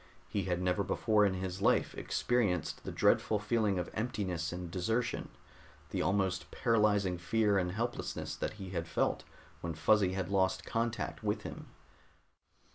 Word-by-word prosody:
He 100 -3 -2
had 90 -2 0
never 90 +2 +1
before 105 +1 +3
in 95 - -1
his 95 0 -4
life - - +3
experienced 105 -9 0
the - - -3
dreadful 110 - +3
feeling 105 -1 +1
of 90 -1 -3
emptiness 95 -8 -2
and 90 -1 -5
desertion, 115 +7 -1 0.6
the - - -1
almost 95 -2 0
paralyzing 105 -5 +2
fear 105 +2 +2
and 90 -1 -1
helplessness 120 +4 -3
that - - -3
he 95 -3 -8
had 85 -2 -2
felt - - 0 0.4
when 85 -1 -4
Fuzzy 95 +4 +3
had 95 -2 -2
lost 95 -1 +2
contact 115 0 -2
with - - -1
him. - - -7
95 Hz, 150 wpm, -33 LUFS, 90-110 Hz, 0.6 s, before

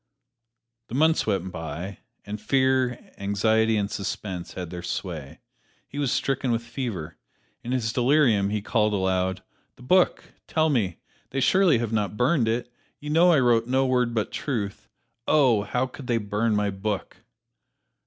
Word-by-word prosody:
The 120 - -6
months 160 0 +3
went 95 -3 -1
by, 85 +3 -6 0.3
and 105 +1 -6
fear, 130 +1 +1
anxiety 110 +3 +2
and 100 0 -1
suspense 95 -2 -4
had 90 -3 -6
their 90 -1 -6
sway. 85 -4 -5 0.5
He 145 - -7
was 140 -4 0
stricken 135 -1 0
with 115 0 0
fever. 115 - -5 0.5
In 120 - -5
his 115 -4 0
delirium 120 -6 +3
he 105 -1 -2
called 105 -2 +1
aloud, 95 -1 0 0.3
"The 125 - -16
book 180 +7 +2
tell 160 -1 +2
me 100 - 0 0.3
they 135 - -2
surely 170 +3 +4
have 115 -1 -2
not 105 -1 -1
burned 125 -1 +2
it 120 +2 -2 0.3
you 150 0 -5
know 170 +3 +5
I 155 - +5
wrote 120 -2 +3
no 130 +1 +2
word 125 -2 +1
but 110 - -1
truth 105 -8 -4 0.4
oh, 130 -8 +4
how 125 +5 -1
could 130 0 -10
they 120 - +2
burn 105 +1 0
my 105 -1 +1
book!" 100 +1 -4
115 Hz, 160 wpm, -25 LUFS, 100-130 Hz, 0.5 s, know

